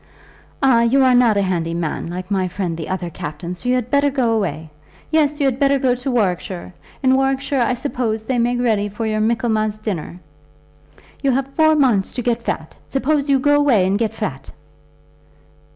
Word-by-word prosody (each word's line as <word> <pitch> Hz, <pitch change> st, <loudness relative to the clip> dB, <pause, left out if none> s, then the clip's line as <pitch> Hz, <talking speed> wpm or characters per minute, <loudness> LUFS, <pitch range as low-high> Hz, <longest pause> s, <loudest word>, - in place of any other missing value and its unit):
"Ah, 250 Hz, -4 st, +5 dB
you 255 Hz, +4 st, +3 dB
are 255 Hz, -1 st, +5 dB
not 240 Hz, -4 st, +4 dB
a 200 Hz, -, +2 dB
handy 170 Hz, -3 st, -1 dB
man, 165 Hz, -1 st, -3 dB
like 180 Hz, +2 st, -6 dB
my 190 Hz, -2 st, +1 dB
friend 180 Hz, -2 st, -3 dB
the 160 Hz, -1 st, -6 dB
other 180 Hz, -2 st, -3 dB
captain, 170 Hz, +4 st, -6 dB
so 215 Hz, +8 st, -5 dB
you 250 Hz, -, +3 dB
had 250 Hz, -1 st, -2 dB
better 285 Hz, 0 st, +3 dB
go 255 Hz, -4 st, +1 dB
away. 160 Hz, -7 st, -2 dB, 0.4 s
Yes; 300 Hz, -2 st, +2 dB
you 285 Hz, -, +2 dB
had 265 Hz, -1 st, 0 dB
better 280 Hz, -1 st, +3 dB
go 260 Hz, -2 st, +2 dB
to 250 Hz, +2 st, -4 dB
Warwickshire. 185 Hz, -6 st, -2 dB, 0.3 s
In 260 Hz, 0 st, +4 dB
Warwickshire, 270 Hz, 0 st, 0 dB
I 240 Hz, +1 st, +1 dB
suppose, 240 Hz, -4 st, -2 dB
they 245 Hz, +2 st, -1 dB
make 245 Hz, +1 st, +1 dB
ready 215 Hz, -4 st, +1 dB
for 210 Hz, +3 st, -4 dB
your 215 Hz, -1 st, -1 dB
Michaelmas 220 Hz, -1 st, 0 dB
dinners. 195 Hz, -6 st, -5 dB, 1.0 s
You 275 Hz, -, +1 dB
have 270 Hz, +1 st, -1 dB
four 315 Hz, 0 st, +4 dB
months 245 Hz, -10 st, +2 dB
to 250 Hz, -, -4 dB
get 235 Hz, 0 st, 0 dB
fat. -, -, -4 dB
Suppose 280 Hz, +1 st, 0 dB
you 275 Hz, -, +5 dB
go 290 Hz, +2 st, +3 dB
away 270 Hz, -10 st, +3 dB
and 195 Hz, +2 st, +1 dB
get 225 Hz, -2 st, 0 dB
fat." 225 Hz, -, -5 dB
235 Hz, 195 wpm, -19 LUFS, 195-270 Hz, 1.0 s, Ah